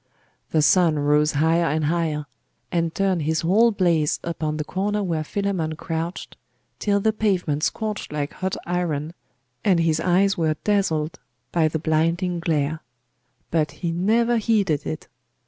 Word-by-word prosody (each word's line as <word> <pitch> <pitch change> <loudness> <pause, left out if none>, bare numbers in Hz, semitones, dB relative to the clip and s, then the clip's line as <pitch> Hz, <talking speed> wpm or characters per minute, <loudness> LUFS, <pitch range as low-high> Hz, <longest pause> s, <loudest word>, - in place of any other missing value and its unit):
The 155 -2 +2
sun 165 -1 +4
rose 150 +1 +2
higher 165 +3 +2
and 155 +2 0
higher, 155 -2 0 0.5
and 170 -2 0
turned 190 -3 +1
his 160 +1 0
whole 210 +8 +4
blaze 170 -8 +1
upon 155 -2 -3
the 155 - -2
corner 205 +5 -1
where 165 -4 -1
Philammon 180 -3 -2
crouched, 165 +2 -5 0.4
till 200 -1 +1
the 220 +2 +1
pavement 180 -9 0
scorched 215 +4 -2
like 145 -1 -3
hot 190 0 -3
iron, 170 -3 -2 0.5
and 190 -5 +3
his 165 -1 +2
eyes 185 +3 +3
were 160 -2 +1
dazzled 180 -6 0 0.3
by 165 -2 +3
the 155 - -1
blinding 165 +3 0
glare: 155 -2 0 0.7
but 155 -2 +1 0.2
he 170 - +1
never 230 +7 +2
heeded 200 - +1
it. 80 - -5
165 Hz, 145 wpm, -23 LUFS, 155-190 Hz, 0.7 s, sun